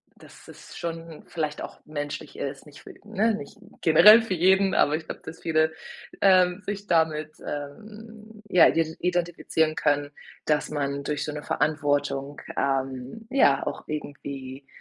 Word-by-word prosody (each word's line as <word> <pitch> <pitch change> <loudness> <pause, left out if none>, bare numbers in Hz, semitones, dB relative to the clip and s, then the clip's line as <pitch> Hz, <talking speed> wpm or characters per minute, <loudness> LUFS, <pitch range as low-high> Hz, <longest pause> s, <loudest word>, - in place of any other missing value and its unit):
dass - - -17
es - - -13
schon 165 -1 -6
vielleicht 155 -3 -3
auch - - -9
menschlich 145 -1 -6
ist, 135 0 -5
nicht 145 - -14
für - - -11
ne, 220 +1 +1
nicht 140 - -10 0.2
generell 210 +8 +8
für 225 -4 -3
jeden, 190 +2 +3
aber 150 - +3
ich 160 0 -5
glaube, - - -7
dass 160 0 -9
viele, 160 -1 +2 0.5
ähm, 185 -1 +4
sich 205 0 -4
damit, 155 -3 +1
ähm, 215 +8 -9
ja, 180 -3 +7
ide 160 -1 0
identifizieren 175 -3 0
können, 145 0 0 0.3
dass 150 -1 +1
man 140 -1 -2
durch 150 0 -2
so 150 - -4
‘ne 150 0 -6
Verantwortung, 145 -2 -1 0.2
ähm, 135 - -2
ja, 140 - +3
auch - - -5
irgendwie, 140 -2 -7
155 Hz, 150 wpm, -25 LUFS, 145-180 Hz, 0.5 s, generell